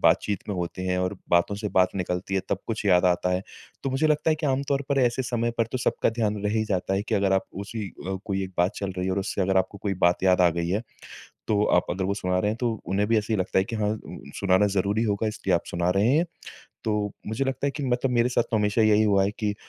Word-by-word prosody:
बातचीत 100 0 +2
में 100 - -1
होते 90 +1 -4
हैं 90 0 0
और 90 +2 -1
बातों 85 +3 +3
से 105 0 -3
बात 90 0 +2
निकलती 90 +1 -2
है 95 - +2
तब 95 - 0
कुछ 110 -2 -3
याद 90 -1 +5
आता 90 0 +2
है। 90 +1 0 0.4
तो 135 - -1
मुझे 135 +4 +1
लगता 150 +1 +2
है - - +4
कि 155 -1 -2
आम 135 0 +1
तौर 140 0 +1
पर 140 -1 +1
ऐसे 125 +1 +2
समय 120 -2 -1
पर 115 - +2
तो 130 - -1
सबका - - +1
ध्यान 110 -2 -1
रह 105 - +1
ही 110 -1 +1
जाता 95 -1 -1
है 100 - 0
कि - - -2
अगर 100 -1 +2
आप 95 - +2
उसी 100 +2 -5 0.2
अ, 95 0 -2
कोई 95 -2 -1
एक 95 - -8
बात 90 +4 +3
चल 100 -1 -3
रही 90 0 -1
है 95 - 0
और 100 - 0
उससे 95 0 -2
अगर 95 +1 +1
आपको 95 +2 0
कोई 100 -2 -1
बात 90 +1 +1
याद 95 -1 +4
आ 90 - +6
गई 85 +1 -2
है 100 +5 0 0.7
तो 105 -1 +2
आप 90 - +3
अगर 95 +2 -2
वो 100 - 0
सुना 90 -2 -1
रहे 105 - +1
हैं 110 - -4
तो 120 -2 +1
उन्हें 100 +3 0
भी 115 -1 +3
ऐसे 105 +1 -1
ही - - +1
लगता 95 - -1
है - - +2
कि 115 +3 -5
हाँ 105 -1 0
उम 110 - -5 0.2
सुनाना 100 +1 +3
ज़रूरी 100 +4 +1
होगा 105 0 0
इसलिए 100 -3 -1
आप 85 - -2
सुना 85 +1 0
रहे 105 +4 +3
हैं। 165 - +3 0.6
तो 110 - 0 0.3
मुझे 110 +6 -1
लगता 135 +1 -1
है - - +2
कि 145 +1 -6
मतलब 125 +1 0
मेरे 120 0 +3
साथ 120 -1 +2
तो 110 - +2
हमेशा 105 +2 +2
यही 110 0 +5
हुआ 100 -2 +3
है 100 - +1
कि 105 -1 0
अ, - - -10
105 Hz, 285 wpm, -25 LUFS, 95-115 Hz, 0.7 s, आ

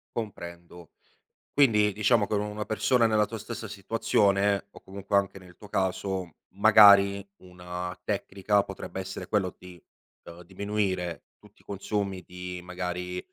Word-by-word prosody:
Comprendo, 85 -6 -7 0.6
quindi 105 -7 +4
diciamo 105 +1 +2
che 110 - -1
u 100 - +1
una 105 0 -4
persona 115 +2 +2
nella 105 -1 +3
tua 115 - -7
stessa 110 +1 -7
situazione 100 -1 +1
o - - -14
comunque 100 +1 -3
anche 100 -1 0
nel 90 -1 -16
tuo 105 - -13
caso, 95 -2 -2
magari 100 -1 +6
una 90 0 -7
tecnica 100 +1 0
potrebbe 95 0 -7
essere 95 0 -6
quello 100 -4 0
di, 90 -2 -13 0.4
uhm, 85 +1 -11
diminuire 95 -3 -2
tutti - - -22
i - - -36
consumi 100 -2 -3
di 90 0 -7
magari, 90 0 -4
100 Hz, 140 wpm, -27 LUFS, 90-105 Hz, 0.6 s, magari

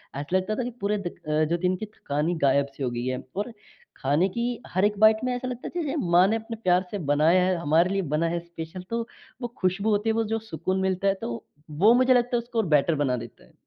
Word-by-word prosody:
ऐसा 145 +6 -3
लगता 210 +3 -1
था 255 - -2
कि 245 - -3
पूरे 205 +1 +1
दि 195 -4 -4
अ, 155 -1 -1
जो 170 - +1
दिन 180 +1 +1
की 200 - -5
थकान 150 -7 -3
ही 175 - 0
गायब-सी 140 0 +1
हो 125 - 0
गई 120 +1 -4
है। 130 0 -2 0.2
और 205 +5 -3 0.5
खाने 145 +7 +2
की 235 +5 -3 0.3
हर 185 +3 +3
एक 205 0 0
बाइट 220 0 +6
में 250 0 0
ऐसा 245 +1 -4
लगता 250 -1 -5
जैसे 320 -5 -2 0.2
माँ 180 +2 +6
ने 220 - +1
अपने 225 +1 -5
प्यार 180 +1 +3
से 205 - -2
बनाया 165 +5 +4
है, 185 0 +2
हमारे 165 +4 +3
लिए 195 0 0
बना 165 - +1
है 170 - 0
स्पेशल। 170 +1 -8
तो 230 0 -1 0.4
वो 240 - -2
खुशबू 195 +3 0
होती 210 +1 +1
है, - - +3
वो 225 0 +1
जो 225 - 0
सुकून 190 -2 -3
मिलता 190 +1 0
है 195 - +4
तो 120 - -3 0.4
वो 190 +10 +4
मुझे 255 +1 +5
लगता 245 0 +2
है 240 - +3
उसको 235 -1 -3
और 215 - +2
बेटर 155 +1 +3
बना 125 -3 0
देता - - -10
है। - - -25
185 Hz, 260 wpm, -26 LUFS, 160-220 Hz, 0.5 s, बाइट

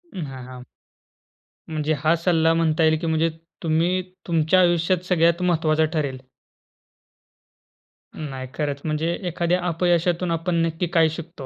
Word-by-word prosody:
हां, 135 -7 -6
हां. 125 -1 -10 1.0
म्हणजे 155 -1 -1
हा 155 +4 +2
सल्ला 165 -1 +2
म्हणता 165 -1 +1
येईल 160 0 +4
की 165 - -3
म्हणजे 160 +1 +2 0.3
तुम्ही 170 +3 +1 0.3
तुमच्या 165 +1 +3
आयुष्यात 175 0 +2
सगळ्यात 170 -1 +2
महत्वाचा 160 -3 +2
ठरेल. 140 -5 -1 2.0
नाही 135 -4 -6
खरंच, 145 -2 -2
म्हणजे 160 +2 -1
एखाद्या 175 +1 0
अपयशातून 175 +1 +1
आपण 165 +2 -1
नक्की 165 +2 -2
काय 165 -2 +3
शिकतो 165 -2 -8
165 Hz, 125 wpm, -23 LUFS, 155-175 Hz, 2.0 s, येईल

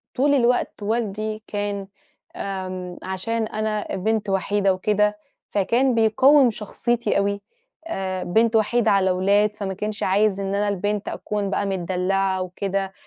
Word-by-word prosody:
طول 285 +3 +3
الوقت 245 -4 +1
والدي 215 0 -2
كان 205 -1 -3 0.5
آمم 185 -2 -5
عشان 220 +5 -2
أنا 215 -1 -2
بنت 210 +2 -1
وحيدة 195 0 +1
وكده، 210 +2 +1 0.3
فكان 235 +6 +2
بيقوِّم 255 +5 +5
شخصيتي 235 +2 -1
أوي، 200 0 0 0.5
آآ 190 - -3
بنت 225 +5 +2
وحيدة 225 +1 +3
على 190 -2 +3
ولاد 200 +3 +2
فما 200 -2 -4
كانش 210 +3 -4
عايز 200 +1 +2
إن 195 0 -2
أنا 205 +1 +1
البنت 205 +1 -2
أكون 205 -2 -3
بقى 200 - -1
متدلّعة 190 0 0
وكده، 195 +1 -3
205 Hz, 135 wpm, -23 LUFS, 195-220 Hz, 0.5 s, بيقوِّم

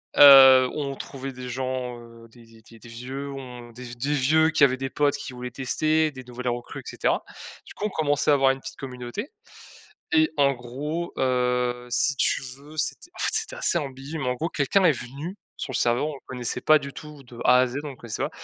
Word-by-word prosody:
Heu, 135 -2 +9
on 140 -2 -3
trouvait 135 0 -7
des 125 -1 -8
gens, 130 -1 -3
heu, 115 0 -14
des 115 0 -18
des 115 0 -19
des 115 +1 -17
des 120 - -14
vieux 135 +4 -6
on 125 -3 -9
des 125 0 -9
des 140 +5 -2
vieux 155 +4 +3
qui 155 - +3
avaient 130 -1 +4
des 135 0 -4
potes 145 -1 +1
qui 135 - -8
voulaient 125 0 -6
tester, 155 +5 +1
des 130 -2 -10
nouvelles 125 0 -5
recrues, 120 0 -5
et - - -23
cetera. - - 0 0.4
Du - - -12
coup 210 - -5
on - - 0
commençait 150 -4 0
à - - +6
avoir 135 -1 +4
une 135 - -4
petite 135 0 -8
communauté 125 - -7 0.8
et 315 -2 +4
en 140 -1 +4
gros 145 +8 -5
heu, 125 -1 0
si 145 +4 +2
tu - - +1 0.2
veux 150 +3 -14
c'était 345 - -3
en - - -12
fait - - +1
c'était 450 +3 -1
assez - - +1
ambigu, 140 +1 -6
mais 135 - -3
en 125 - 0
gros 165 +7 -3
quelqu'un 180 +7 +1
est 165 - +6
venu 140 +10 -7 0.2
sur 135 - -5
le - - -1
serveur, 120 +5 +2
on 155 - -4
le 135 - -11
connaissait 125 -2 -4
pas 155 0 +5
du 140 -1 -8
tout 150 -2 -11
de 120 -1 -14
A 125 - +6
à 130 - +3
Z, 125 +3 -5
on 150 - -6
le 130 - -11
connaissait 115 -2 -5
pas, - - -1
135 Hz, 235 wpm, -25 LUFS, 125-145 Hz, 0.8 s, Heu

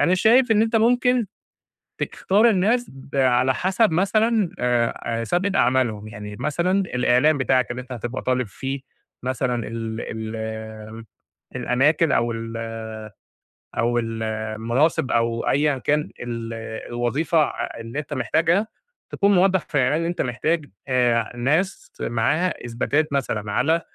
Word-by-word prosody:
أنا 180 - +4
شايف 230 +6 +4
إن 215 0 +4
أنت 225 +1 +1
ممكن 245 +1 +3 0.7
تختار 210 +5 +2
الناس 225 +5 +1 0.2
على 130 -1 +3
حسب 190 - +2
مثلًا 210 +3 +2
آآ 120 -1 +1
آآ 115 0 -1
سابقة 180 - 0
أعمالهم، 120 -4 +1
يعني 105 -1 -8
مثلًا 170 +4 0
الإعلام 130 -1 +2
بتاعك 130 -1 +1
اللي 125 +1 -4
أنت 130 - -14
هتبقى 120 +1 -4
طالب 125 -2 0
فيه 135 +7 -5 0.4
مثلًا 125 -2 -1
ال 115 -1 -4
ال 110 0 -6 0.5
الأماكن 145 +5 +2
أو 120 0 +2
ال 115 0 -5 1.2
أو 120 +1 +1
ال 115 -1 -3
المناصب 110 +7 0
أو 115 0 +1
أيًا 145 0 +2
كان 150 +4 +1 0.2
ال 115 -1 -5 0.4
الوظيفة 140 +7 +1
آآ - - -4
اللي 115 +5 -5
أنت 150 0 -6
محتاجها، 165 - +1 0.4
تكون 200 0 +2
موضح 190 +1 +4
في - - -7
الإعلان 140 +2 +3
اللي 165 +1 -1
أنت 175 - -2
محتاج 150 +6 -1 0.7
ناس 150 +11 0
معاها 145 +9 0
إثباتات 140 +6 0
مثلًا 105 -7 -1
على 160 +9 +2
130 Hz, 135 wpm, -23 LUFS, 115-175 Hz, 1.2 s, أنا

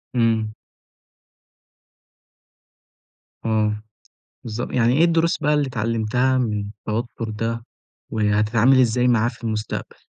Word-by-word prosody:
إمم. 110 -2 +1 2.9
آه، 105 -1 +1 0.6
بالضبط. 115 0 -4
يعني 120 -1 +3
ايه 165 - +6
الدروس 170 0 +2
بقى 150 +1 +3
اللي 145 -1 +2
اتعلمتها 115 +2 0
من 105 -5 -1 0.2
التوتر 115 +1 -3
ده؟ 115 +2 -3 0.5
وهتتعامل 110 +4 +3
إزاي 125 0 +3
معاه 115 -1 +3
في 115 0 -10
المستقبل؟ 110 -1 -4
115 Hz, 100 wpm, -22 LUFS, 110-125 Hz, 2.9 s, ايه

